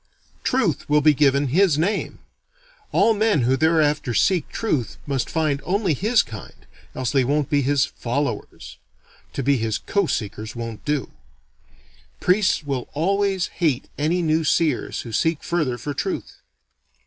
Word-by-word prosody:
Truth 210 - 0
will 150 0 +4
be 155 +1 +5
given 140 -1 +2
his 170 +1 +3
name. 180 +7 -1 0.7
All 225 - +4
men 215 - +2
who 125 +2 +2
thereafter 150 -4 +2
seek 175 - +2
truth 150 - -2
must 135 -4 -2
find 155 -4 0
only 195 -2 +1
his 215 - +2
kind, 110 -3 -11 0.3
else 130 -2 -2
they 135 -2 +3
won't 145 +2 0
be 145 -1 +3
his 140 0 +2
"followers." 140 +4 -4 0.6
(To 135 - -3
be 140 +1 +3
his 110 -2 -1
co 200 -3 0
seekers 110 -1 -4
won't 115 -2 -6
do.) 145 -2 -1 1.1
Priests 185 -2 +2
will 135 -4 -3
always 195 +3 0
hate 145 -6 +1
any 165 +4 0
new 160 0 +2
seers 155 -4 0
who 115 - -9
seek 160 +6 0
further 155 -8 -1
for 145 +5 -5
truth. - - -4
150 Hz, 150 wpm, -22 LUFS, 130-175 Hz, 1.1 s, be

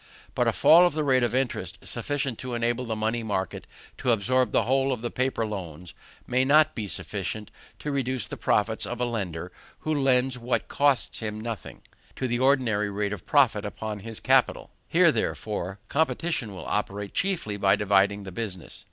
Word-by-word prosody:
But - - +1
a - - +4
fall 175 +3 +7
of 175 - -3
the 155 - 0
rate 130 -3 +3
of 120 0 0
interest, 120 -9 -2
sufficient 135 0 -3
to 125 -2 -4
enable 120 +2 0
the 115 -1 -2
money 110 +2 -1
market 95 -5 -3 0.3
to 125 - +1
absorb 125 +4 +2
the - - +3
whole 135 +4 +2
of 125 -3 -3
the 120 - -2
paper 130 -3 0
loans, 90 -5 -7 0.3
may 125 +1 +2
not 155 +3 +5
be 110 -3 -4
sufficient 105 +2 -4 0.3
to 150 - -4
reduce 130 -5 -1
the - - -6
profits 110 +2 0
of 120 - -5
a 125 - +1
lender 90 -7 -4 0.3
who 155 - -1
lends 130 -3 +2
what 125 +1 -1
costs 140 -3 +1
him 110 -1 -4
nothing, 115 -1 -6 0.3
to 130 - -2
the 120 0 -1
ordinary 125 -6 +2
rate 100 0 -2
of 100 - -9
profit 125 -8 +4
upon 105 0 -5
his 110 +2 -7
capital. - - +2 0.2
Here, - - +5
therefore, 95 +3 -3
competition 160 -5 0
will 90 - -8
operate 105 -1 -3
chiefly 180 - -1
by 100 -1 +3
dividing 100 0 +2
the 95 - -8
business. 95 -4 -6
115 Hz, 185 wpm, -26 LUFS, 105-130 Hz, 0.3 s, fall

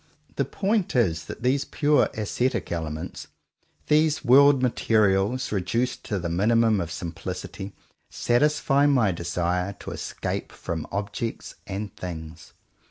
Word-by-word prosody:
The - - +1
point 200 -4 -1
is 80 -10 +2
that - - -8
these 135 +2 +2
pure 150 -1 +2
ascetic 115 +4 -1
elements, 80 0 -4 0.6
these 155 0 +2
world 135 +1 +6
materials 110 0 +2
reduced 110 +6 -1
to 105 - -2
the 90 -2 -3
minimum 110 +4 +3
of 85 -1 -4
simplicity, 90 +3 -6 0.3
satisfy 145 +2 +2
my 125 -8 +3
desire 90 +2 -1
to 100 - -9
escape - - -4
from 80 -2 -5
objects 105 +3 -4
and 100 +1 -5
things. 80 -2 -8
105 Hz, 120 wpm, -25 LUFS, 90-130 Hz, 0.6 s, world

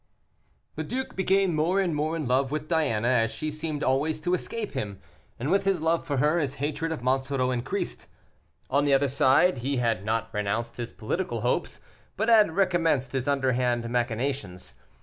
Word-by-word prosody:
The - - -2
duke 260 +1 -4
became 190 -1 +2
more 165 +5 +1
and 180 -4 +1
more 155 +2 -1
in 155 -5 -3
love 130 +2 +2
with 150 +1 -3
Diana, 140 -10 +1
as 120 -3 +3
she 155 +7 -4
seemed 155 -1 -4
always 150 +4 +1
to 175 +3 0
escape 215 +3 -3
him, 105 -8 -4 0.4
and 135 +7 -2
with 195 - +3
his 195 -2 +1
love 165 +1 +1
for 140 -3 -1
her, 150 +5 +3
his 145 -4 -2
hatred 155 +3 -2
of 155 -6 -4
Monsoreau 130 0 +1
increased. 155 +10 -3 0.6
On 140 +2 +3
the 140 -1 +4
other 140 +1 +2
side 135 +4 +3
he 135 +3 -1
had 115 -5 0
not 110 +2 -2
renounced 110 +3 -2
his 120 -1 -4
political 120 - -3
hopes, 120 +2 -1 0.4
but 220 +3 +1
had 215 -8 +5
recommenced 165 -9 +2
his 135 0 -2
underhand 125 -4 +1
machinations. 120 -5 -2
140 Hz, 180 wpm, -27 LUFS, 125-165 Hz, 0.6 s, had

